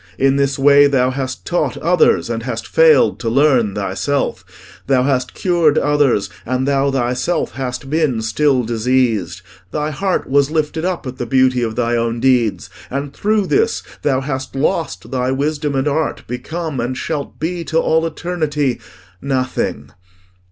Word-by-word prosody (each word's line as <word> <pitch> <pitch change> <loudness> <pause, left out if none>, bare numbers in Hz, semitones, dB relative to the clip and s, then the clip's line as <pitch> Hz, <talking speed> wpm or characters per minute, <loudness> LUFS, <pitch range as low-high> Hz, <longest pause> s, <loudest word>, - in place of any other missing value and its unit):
In 135 0 +3
this 140 -1 +1
way 145 +1 +6
thou 130 -2 +2
hast 130 -1 -5
taught 155 -6 -1
others, 175 +1 +2
and 115 -1 -3
hast 115 -2 -4
failed 160 -4 +4
to 115 - -2
learn 125 -5 +3
thyself. 105 +8 -2 0.4
Thou 130 -2 +3
hast 130 -2 -1
cured 170 -5 +2
others: 145 -8 +2 0.2
and 130 +2 -1
thou 140 0 +2
thyself 135 +5 -1
hast 130 +1 -5
been 145 -6 0
still 130 +3 +2
diseased. 110 -6 0 0.3
Thy 150 +6 -2
heart 185 +6 -1
was 140 +1 +2
lifted 160 +1 -1
up 180 -4 -2
at 130 0 -7
the 120 - -3
beauty 130 0 +3
of 110 -2 -2
thy 120 -1 0
own 115 0 -1
deeds, 125 -4 +1 0.2
and 140 +1 -4
through 210 -1 +1
this 445 - +1 0.2
thou 135 -2 +1
hast 130 -1 -4
lost 160 +4 -2
thy 130 -1 -1
wisdom 145 +1 -1
and 135 +2 0
art 150 +1 -1
become, 155 +4 -4
and 125 +2 -2
shalt 145 -1 -4
be 170 +2 -2
to 160 - -1
all 160 0 +2
eternity, 155 -5 -2 0.4
nothing... 130 - -2
135 Hz, 160 wpm, -18 LUFS, 125-150 Hz, 0.4 s, way